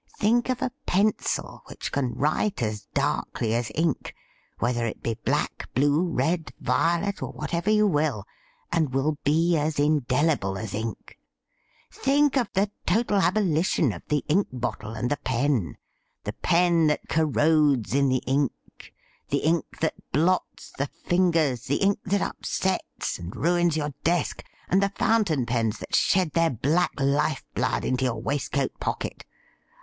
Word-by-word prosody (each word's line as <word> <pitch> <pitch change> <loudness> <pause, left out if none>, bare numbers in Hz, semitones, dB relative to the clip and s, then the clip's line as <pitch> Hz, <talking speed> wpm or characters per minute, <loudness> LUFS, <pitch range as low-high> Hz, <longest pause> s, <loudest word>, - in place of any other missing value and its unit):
Think 235 +4 +2
of 255 -1 -1
a 255 - -1 0.2
pencil 200 +3 0
which - - -6
can 130 -3 -1
write 155 - 0
as 105 -1 -3
darkly 110 -1 0
as 115 -1 -1
ink 160 -2 -1 0.2
— - - -38
whether 120 0 0
it 110 - -6
be 115 - 0
black, 110 - -2
blue, 145 +4 +3
red, 160 +4 0
violet, 170 +4 +1
or - - -4
whatever 170 +4 -2
you 215 0 +4
will 150 - 0 0.2
— - - -38
and 155 -6 +1
will 145 +2 0
be 165 +4 +3
as 155 0 0
indelible 145 -7 +1
as 105 +1 -5
ink. 110 0 -5 0.7
Think 285 +1 +2
of 250 -4 +1
the 200 +2 +1 0.2
total 210 +2 +2
abolition 170 - +2
of 85 - -9
the 150 -1 0
ink 190 +7 +2
bottle 120 -3 -4
and 120 +4 -2
the 145 - +1
pen 130 - 0 0.2
— - - -48
the - - -4
pen 170 -2 +3
that 150 - 0
corrodes 150 -5 +2
in 140 0 +3
the 130 -1 +1
ink 135 0 +1 0.6
— - - -37
the 140 - 0
ink 165 +2 0
that 160 - +1 0.2
blots 175 +6 0
the 140 - 0
fingers, 165 -9 +1
the 140 - +1
ink 200 +4 +2
that 200 +1 +1
upsets 190 0 -2
and 85 +3 -7
ruins 175 -1 +2
your 150 -2 -2
desk, 170 +1 0 0.2
and 190 +2 +3
the 200 - +2
fountain 200 - +1
pens 115 -2 0
that - - -10
shed 180 -4 +3
their 165 +1 +3
black 150 +7 0
life 140 +2 +1
blood 125 +1 0
into 130 0 0
your 115 -3 -1
waistcoat 140 +2 -1
pocket - - -4
150 Hz, 160 wpm, -26 LUFS, 130-175 Hz, 0.7 s, you